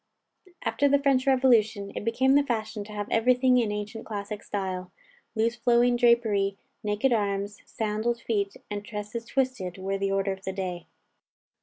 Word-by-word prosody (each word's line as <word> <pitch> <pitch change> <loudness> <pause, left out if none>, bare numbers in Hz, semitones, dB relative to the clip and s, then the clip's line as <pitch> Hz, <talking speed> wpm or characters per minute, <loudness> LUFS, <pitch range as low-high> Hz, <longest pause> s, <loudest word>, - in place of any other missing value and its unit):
After 285 - +2
the 285 - +5
French 275 -1 +2
revolution, 230 -6 +3
it - - -4
became 255 +4 +2
the 285 - +6
fashion 220 -5 -3
to 210 - -11
have 205 -1 -4
everything 250 +2 +4
in 225 -3 0
ancient 210 +1 -5
classic 205 -1 -5
style. 185 -2 -4 0.4
Loose 230 +2 +1
flowing 240 +1 +3
drapery, 220 -5 +3 0.3
naked 210 +5 +1
arms, 200 -1 -1
sandaled 220 +2 -1
feet, 205 -4 -1
and 205 0 -3
tresses 210 +2 -6
twisted, 250 -9 -1
were 195 +1 -2
the 195 0 0
order 195 0 +1
of 190 0 -7
the 190 - -3
day. 180 -3 -4
215 Hz, 160 wpm, -27 LUFS, 200-240 Hz, 0.4 s, the